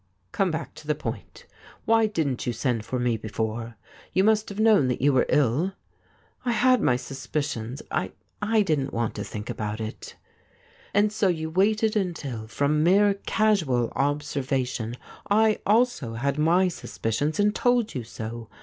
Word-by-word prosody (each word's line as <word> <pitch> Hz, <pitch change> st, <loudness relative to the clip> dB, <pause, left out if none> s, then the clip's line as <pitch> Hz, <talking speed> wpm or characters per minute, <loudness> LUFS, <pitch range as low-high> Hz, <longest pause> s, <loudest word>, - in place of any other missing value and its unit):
' -, -, -46 dB
Come 195 Hz, -2 st, +1 dB
back 160 Hz, -, -4 dB
to 150 Hz, -, -13 dB
the 150 Hz, -, +1 dB
point. 155 Hz, -, -7 dB, 0.4 s
Why 225 Hz, -1 st, +4 dB
didn't 150 Hz, -, -2 dB
you 120 Hz, -, 0 dB
send 115 Hz, -1 st, -1 dB
for 115 Hz, +4 st, -3 dB
me 120 Hz, -2 st, +1 dB
before 110 Hz, +2 st, -4 dB, 0.2 s
— -, -, -24 dB
you 190 Hz, -, +4 dB
must 215 Hz, 0 st, +3 dB
have 200 Hz, +1 st, -7 dB
known 215 Hz, -11 st, +5 dB
that 125 Hz, -, -1 dB
you 140 Hz, +2 st, +3 dB
were 130 Hz, -, +3 dB
ill 150 Hz, +7 st, +2 dB, 0.3 s
?' -, -, -36 dB
'I 245 Hz, -, 0 dB
had 255 Hz, +2 st, +4 dB
ray 125 Hz, -, +3 dB
suspicions. 135 Hz, -1 st, -4 dB
I -, -, -1 dB, 0.2 s
— -, -, -42 dB, 0.2 s
I 215 Hz, -, +5 dB
didn't 145 Hz, -7 st, -1 dB
want 115 Hz, -1 st, -1 dB
to 105 Hz, -, -5 dB
think 105 Hz, +1 st, -7 dB
about 105 Hz, 0 st, -4 dB
it.' 110 Hz, 0 st, -7 dB, 0.4 s
' -, -, -29 dB
And 205 Hz, +1 st, +3 dB
so 215 Hz, -2 st, +2 dB
you 160 Hz, -3 st, -1 dB
waited 215 Hz, +5 st, +2 dB
until, 145 Hz, -, -3 dB
from 145 Hz, +6 st, +1 dB
mere 200 Hz, +4 st, +5 dB
casual 160 Hz, -, +2 dB
observation, 135 Hz, -4 st, -1 dB, 0.3 s
I 215 Hz, +1 st, +4 dB
also 215 Hz, -, +2 dB
had 140 Hz, +5 st, -1 dB
my 175 Hz, +5 st, +4 dB
suspicions, 150 Hz, -, -2 dB
and 205 Hz, 0 st, +3 dB
told 245 Hz, -2 st, +1 dB
you 125 Hz, -, -3 dB
so. 115 Hz, 0 st, -7 dB
145 Hz, 175 wpm, -25 LUFS, -, 0.4 s, known